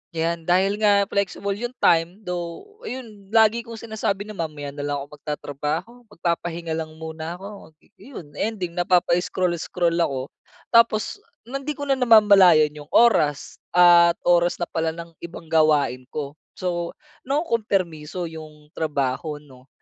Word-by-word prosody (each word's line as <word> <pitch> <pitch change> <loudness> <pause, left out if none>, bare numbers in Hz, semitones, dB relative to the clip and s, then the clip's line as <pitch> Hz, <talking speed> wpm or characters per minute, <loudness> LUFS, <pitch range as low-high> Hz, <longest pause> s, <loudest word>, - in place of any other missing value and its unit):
'Yan 165 0 -2
dahil 195 +4 +2
nga 205 -2 +4
flexible 200 0 -2
'yong 240 +4 -5
time, 170 +5 +2
though 180 - -6
'yon 220 -6 -8
lagi 225 +1 +4
kong 230 -1 -8
sinasabi 220 -3 -3
na 215 - -9
mamaya 155 -6 -5
na 145 - -12
lang 145 - -1
ako 150 +1 -14
magtatrabaho, 150 - -4 0.2
magpapahinga 170 -3 -3
lang 160 -1 -4
muna 160 +1 -6
ako, 195 -4 -11
eh - - -28 0.2
yun 145 -4 -9
ending 200 -6 -2
napapa-scroll, 180 0 +1
scroll 170 -1 0
ako 135 -4 -1 0.4
tapos 230 - +3 0.2
hindi 275 +4 -5
ko 285 - -6
na 270 -1 +1
namamalayan 200 -10 +6
'yong 150 -1 -11
oras, 155 -12 +3 0.2
at 175 -1 +7
oras 175 0 +3
na - - -3
pala 160 -1 -1
ng 170 0 -9
ibang 170 -1 -9
gawain 150 -5 +3
ko. 145 -1 -5 0.2
So 175 -2 -3 0.4
nakumkompermiso 190 - -1
'yong 155 -1 -12
trabaho 145 0 -2
'no, 130 -2 -18
175 Hz, 140 wpm, -23 LUFS, 155-205 Hz, 0.4 s, at